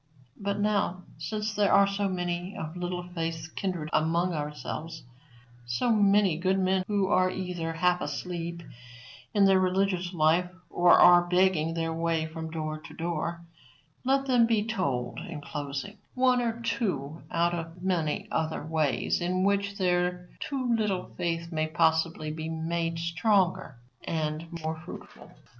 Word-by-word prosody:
But, 200 0 -2
now, 200 -3 0 0.2
since 215 -1 -3
there 205 -1 +2
are 200 - +7
so 200 0 -1
many 175 +1 -3
of 160 +2 -5
Little 180 0 -3
Faith's 165 -2 -4
kindred 175 -3 -3
among 170 +3 +2
ourselves 150 +2 -5 0.6
so 120 - +1
many 200 -5 +4
good 190 +2 +2
men 190 0 +2
who 205 -2 +1
are 185 -2 +3
either 180 -3 -3
half 180 +2 +2
asleep 170 -1 -4 0.7
in 200 -1 +6
their 195 -1 +5
religious 185 -1 +1
life 170 +1 +3 0.2
or 175 0 +6
are 175 0 +7
begging 180 -3 +2
their 165 -1 -1
way 165 -1 0
from 160 0 -6
door 155 -1 -4
to - - -12
door 170 0 -3 0.6
let 270 +1 +2
them 245 -3 +4
be 220 -3 +2
told, 140 - -2
in 155 - -7
closing, 145 +8 -5 0.2
one 255 -1 +3
or 230 -1 -1
two 170 - -2
out 170 +1 +1
of 165 +1 -6
many 170 -5 0
other 160 -1 -1
ways 155 -2 0
in 185 +1 0
which 200 0 +1
their 180 -1 0
too 255 -4 -1
little 210 -4 -1
faith 170 0 -2
may 155 -1 0
possibly 160 -1 +1
be 160 +1 -5
made 165 +1 -2
stronger 175 - +1 0.3
and 155 0 -2 0.2
more 160 0 -3
fruitful. 175 - -11
175 Hz, 150 wpm, -28 LUFS, 160-195 Hz, 0.7 s, are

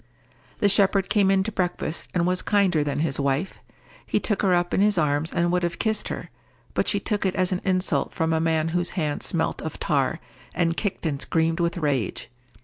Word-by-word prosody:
The 205 - +2
shepherd 195 -1 +3
came 200 -3 +4
in 195 -1 +3
to 220 - -3
breakfast, 180 -4 -3
and 175 -1 +2
was 180 +1 0
kinder 190 -7 +2
than 145 0 -2
his 150 -4 -1
wife. 140 +6 -1 0.4
He - - 0
took 210 - -1
her 195 - +2
up 175 0 +1
in - - +2
his 205 -1 +3
arms 150 0 +1
and 175 0 +1
would 180 0 +1
have 170 -1 -2
kissed 220 -1 0
her; - - -6 0.4
but - - 0
she - - +2
took 210 -2 -1
it 190 -2 0
as 185 0 +1
an 185 - -1
insult 185 -6 0
from 160 0 0
a 160 - +2
man 160 -1 +1
whose 175 +1 +2
hands 150 -4 -2
smelt - - -1
of - - -6
tar, - - 0 0.4
and 165 -2 +1
kicked 200 -3 -3
and 145 -3 -1
screamed 165 0 0
with 170 +1 0
rage. 135 - -2
175 Hz, 215 wpm, -24 LUFS, 160-190 Hz, 0.4 s, came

